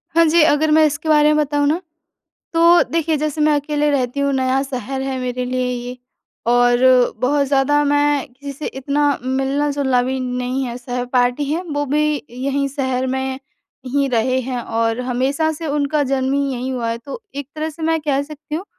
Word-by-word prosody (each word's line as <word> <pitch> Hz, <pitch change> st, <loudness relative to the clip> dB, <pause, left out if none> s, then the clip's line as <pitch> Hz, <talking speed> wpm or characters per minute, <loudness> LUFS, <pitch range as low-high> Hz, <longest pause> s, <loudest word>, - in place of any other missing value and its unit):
हाँ 335 Hz, 0 st, +6 dB
जी। 325 Hz, +1 st, +4 dB
अगर 305 Hz, 0 st, +3 dB
मैं 310 Hz, 0 st, +6 dB
इसके 310 Hz, +2 st, -2 dB
बारे 300 Hz, 0 st, +5 dB
में -, -, +1 dB
बताऊँ 290 Hz, -1 st, +1 dB
ना, 320 Hz, +5 st, +1 dB, 0.7 s
तो 335 Hz, +1 st, +6 dB
देखिए 325 Hz, -1 st, 0 dB
जैसे 305 Hz, +1 st, -2 dB
मैं 300 Hz, 0 st, +4 dB
अकेले 295 Hz, 0 st, 0 dB
रहती 265 Hz, -1 st, -1 dB
हूँ, 280 Hz, 0 st, +1 dB
नया 260 Hz, 0 st, +1 dB
शहर 265 Hz, -1 st, -4 dB
है 265 Hz, -1 st, -3 dB
मेरे 250 Hz, 0 st, -3 dB
लिए 255 Hz, 0 st, -1 dB
ये, 245 Hz, 0 st, -5 dB, 0.5 s
और 245 Hz, 0 st, +4 dB, 0.4 s
बहुत 280 Hz, +4 st, +1 dB
ज़्यादा 280 Hz, +2 st, +2 dB
मैं 290 Hz, -1 st, +2 dB
किसी 280 Hz, +2 st, -8 dB
से 280 Hz, +2 st, -7 dB
इतना 280 Hz, +2 st, -1 dB, 0.2 s
मिलना-जुलना 270 Hz, 0 st, 0 dB
भी 260 Hz, +1 st, -2 dB
नहीं 250 Hz, +1 st, -2 dB
है। 240 Hz, -1 st, -5 dB
सहपाठी 245 Hz, +2 st, 0 dB
हैं, 330 Hz, +4 st, -1 dB
वो 290 Hz, 0 st, -1 dB
भी 300 Hz, +1 st, 0 dB
यहीं 275 Hz, +3 st, -1 dB
शहर 260 Hz, -2 st, -2 dB
में 265 Hz, 0 st, -2 dB, 0.5 s
ही 280 Hz, +2 st, +1 dB
रहे 255 Hz, +1 st, +1 dB
हैं 250 Hz, -1 st, -3 dB
और 225 Hz, +1 st, -1 dB
हमेशा 260 Hz, +5 st, 0 dB
से, 320 Hz, +1 st, -6 dB
उनका 290 Hz, 0 st, 0 dB
जन्म 265 Hz, -1 st, 0 dB
ही 280 Hz, -1 st, 0 dB
यहीं 255 Hz, +1 st, -3 dB
हुआ 240 Hz, -3 st, -2 dB
है। 230 Hz, -, -3 dB
तो 275 Hz, -, -8 dB
एक 280 Hz, -1 st, -6 dB
तरह 310 Hz, +1 st, -3 dB
से 320 Hz, +2 st, -11 dB
मैं 325 Hz, 0 st, +1 dB
कह 285 Hz, -2 st, 0 dB
सकती 300 Hz, 0 st, -9 dB
हूँ 340 Hz, +5 st, -3 dB
275 Hz, 190 wpm, -19 LUFS, 255-295 Hz, 0.7 s, हाँ